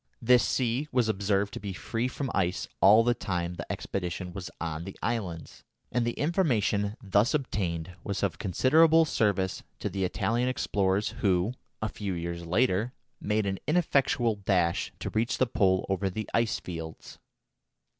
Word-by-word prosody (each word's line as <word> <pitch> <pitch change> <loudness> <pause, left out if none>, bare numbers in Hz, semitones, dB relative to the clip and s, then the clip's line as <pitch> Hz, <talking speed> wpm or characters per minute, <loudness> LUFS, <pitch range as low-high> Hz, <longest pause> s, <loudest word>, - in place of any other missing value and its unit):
This 125 -1 +5
sea 130 +3 0
was 125 -3 +2
observed 100 -1 0
to - - -5
be 100 -1 -5
free 115 +6 -2
from 130 0 -4
ice 90 -1 0
all 105 +4 +7
the 120 +1 +3
time 90 -6 -3
the - - -6
expedition 90 -1 -4
was 90 -2 -6
on 80 -1 -3
the 95 +2 -8
islands, 95 -9 -3 0.3
and 120 0 +1
the 120 - 0
information 115 - +1
thus 100 +6 +3
obtained 90 - -2
was 100 0 -3
of 85 -6 -1
considerable 160 - +5
service 100 -9 0 0.2
to - - -3
the 95 -1 -2
Italian 120 +6 0
explorers 100 -5 0
who, 95 +3 +2 0.3
a - - +1
few 100 -3 -4
years 85 0 -4
later, 110 +4 +1 0.3
made 105 0 0
an 95 -1 -2
ineffectual 140 -8 +2
dash 90 -4 +1
to - - -5
reach 115 +4 0
the 130 - +3
Pole 95 -5 +2
over 95 0 0
the 110 +3 -4
ice 115 -1 +1
fields. 80 -3 -8
100 Hz, 160 wpm, -28 LUFS, 90-120 Hz, 0.3 s, all